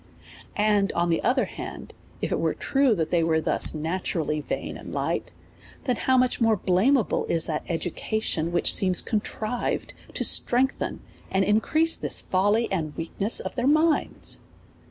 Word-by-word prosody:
And, 205 -1 +2
on 170 0 +1
the 165 - +1
other 255 +1 +2
hand, - - -8 0.3
if - - -1
it - - 0
were - - 0
true 270 -4 +2
that 160 -3 -2
they 170 -2 +2
were 160 -1 +2
thus 160 - +1
naturally 160 -1 -2
vain - - -4
and - - -9
light, - - -2 0.5
then 250 -3 0
how 260 +3 +2
much 255 -1 +2
more 225 -1 +4
blameable 205 +7 +2
is 165 -1 +1
that 155 -2 -2
education, 170 0 -2
which 175 - +4
seems 185 -2 +2
con 215 -2 0
trived 225 +3 -3 0.2
to - - 0
strengthen 260 +2 +2 0.3
and 190 0 +1
increase 310 +10 +2
this - - 0
folly 205 +5 +1
and 155 -6 -2
weak 165 0 -5
ness 205 +4 +4
of - - -5
their 250 +1 -1
minds 310 +2 +1
205 Hz, 165 wpm, -25 LUFS, 170-245 Hz, 0.5 s, more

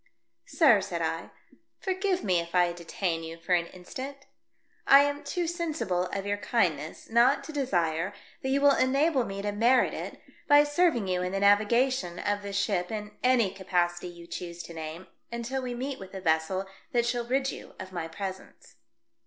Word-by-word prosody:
"Sir," 265 - +5
said 175 -4 -3
I, 165 +1 -2 0.5
"forgive 375 -1 -1
me 180 -3 +2
if 170 +1 -5
I 175 -1 +4
detain 170 0 -3
you 165 0 -7
for 175 +2 -1
an 170 -1 +2
instant. 260 +11 -8 0.7
I 275 -5 +9
am 285 0 -1
too 345 +5 -2
sensible 315 - -1
of 195 +1 -4
your 205 0 0
kindness 170 -9 -1
not 240 +5 +4
to - - -7
desire 175 - 0 0.3
that 265 - -2
you 275 +1 +2
will 285 -1 +6
enable 275 0 +2
me 195 0 -5
to 205 - -1
merit 235 +5 +3
it - - -6 0.3
by 290 -1 +7
serving 290 - +2
you 180 -1 0
in 180 +1 -2
the 195 - 0
navi 205 +1 +5
gation 240 -8 +1
of 205 +2 -1
this 200 -1 -4
ship 200 -3 0
in 210 -1 -4
any 245 -6 +3
capacity 180 -2 -1
you 170 -1 -11
choose 170 0 -6
to 170 - -10
name, 160 +2 -7 0.3
until 235 +3 -3
we 250 -1 -4
meet 265 +2 -4
with 190 0 -10
a - - -4
vessel 165 +2 +1 0.3
that 240 -1 +3
shall 240 0 -1
rid 265 +2 +1
you - - -10
of 190 0 -8
my 170 -2 -3
presence." 190 - -8
200 Hz, 185 wpm, -28 LUFS, 175-265 Hz, 0.7 s, I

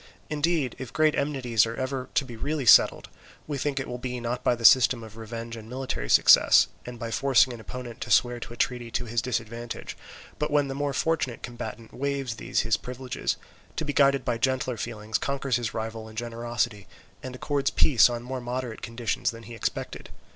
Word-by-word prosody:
Indeed 150 -4 0
if 130 -3 -6
great 155 -1 +3
enmities 125 -6 +1
are 115 - -4
ever 130 0 -3
to 150 -4 +2
be 120 -3 -9
really 145 +4 -2
settled, - - +6 0.4
we 145 -2 -4
think 140 0 -1
it 135 - -4
will 125 0 -5
be, 125 0 -4
not 120 +1 -3
by 120 - +3
the 115 -1 -4
system 120 -2 +6
of 110 -1 -11
revenge 115 +1 -7
and 110 -1 -10
military 125 - -4
success, - - +7 0.2
and 125 -1 -7
by 115 0 -5
forcing 130 0 +3
an 120 - -9
opponent 120 0 -8
to - - -5
swear 120 -1 +3
to 120 - -8
a - - -12
treaty 125 -1 -1
to 120 +1 -2
his 115 0 -1
disadvantage, 115 -1 -4 0.4
but 150 - 0
when 145 -2 +2
the - - -3
more 140 0 -2
fortunate 145 -5 -1
combatant 120 -2 -7
waives 135 -4 -2
these - - 0
his 110 -4 +1
privileges, 125 +3 -4 0.4
to 160 - -2
be 145 - -2
guided 140 -1 +3
by 115 - -1
gentler 130 0 0
feelings 110 -1 -3
conquers 140 -2 -1
his 120 -2 -4
rival 110 0 -5
in 110 - -13
generosity, 115 -3 -3 0.3
and 130 -1 -7
accords 140 +1 0
peace 125 -5 +5
on 120 -1 -4
more 130 +1 -5
moderate 120 -1 -4
conditions 115 -1 -2
than 115 0 -8
he 120 +2 -10
expected. 115 - -4
120 Hz, 200 wpm, -26 LUFS, 115-135 Hz, 0.4 s, success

